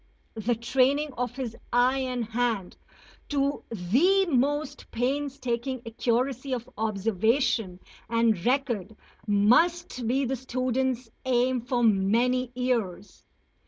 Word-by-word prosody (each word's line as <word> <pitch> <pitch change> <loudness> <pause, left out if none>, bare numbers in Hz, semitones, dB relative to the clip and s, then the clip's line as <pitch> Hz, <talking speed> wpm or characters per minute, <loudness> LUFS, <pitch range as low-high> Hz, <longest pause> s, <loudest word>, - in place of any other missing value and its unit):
The 230 +2 -1
training 270 +5 +1
of 245 -1 -3
his 250 -4 -4 0.2
eye 250 +2 +3
and 250 -3 -2
hand 230 -4 -1 0.5
to 280 0 0
the 260 - +3
most 290 -1 -1
painstaking 260 -1 -2
accuracy 250 +3 -1
of 240 -2 -4
observation 220 0 0 0.3
and 230 -5 +2
record 240 -6 0 0.3
must 250 +7 +2
be 265 +3 +1
the 265 +2 -1
student's 255 -1 -2
aim 255 0 +1
for 245 0 -1
many 230 +5 +2
years. 230 -7 -2
245 Hz, 105 wpm, -27 LUFS, 225-265 Hz, 0.5 s, eye